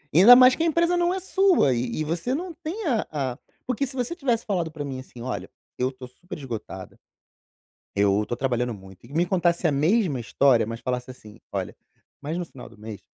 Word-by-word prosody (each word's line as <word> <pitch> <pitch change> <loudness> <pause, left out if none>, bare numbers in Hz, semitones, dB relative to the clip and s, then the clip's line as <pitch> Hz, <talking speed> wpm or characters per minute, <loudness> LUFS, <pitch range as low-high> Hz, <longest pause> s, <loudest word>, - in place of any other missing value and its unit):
Ainda 205 +9 +10
mais 255 0 +7
que, 325 - -1
a - - +2
empresa 335 +2 +2
não 350 +1 +2
é 380 - -2
sua, 375 - +3
e 120 +3 -2
e - - +1
você 170 +10 -2
não 350 +3 -5
tem 350 +6 -6
a 235 -7 0
a 135 -4 -3 0.3
porque 255 +2 0
se 260 - -7
você 250 +6 -2
tivesse 245 -8 0
falado 175 -6 -1
pra 150 -2 -6
mim, 135 -2 -5
assim, 125 -2 -12
"Olha, 125 +1 -4 0.3
eu 125 +1 +1
estou 130 -1 -10
super 175 +9 -10
esgotada, 115 -9 -8 1.0
eu 100 0 +3
estou 120 +3 -4
trabalhando 125 -2 -1
muito," 95 0 -14
e 130 - -14
me 170 +3 +2
contasse 175 -1 +1
a - - +2
mesma 155 - +2
história, 120 +1 +3
mas 115 +1 -6
falasse, 125 +1 -3
assim, 110 -3 -15
"Olha, - - -4 0.5
mas 155 +4 -3
no 180 - -3
final 135 -6 -12
do - - -18
mês 105 -2 -9
150 Hz, 215 wpm, -25 LUFS, -, 1.0 s, Ainda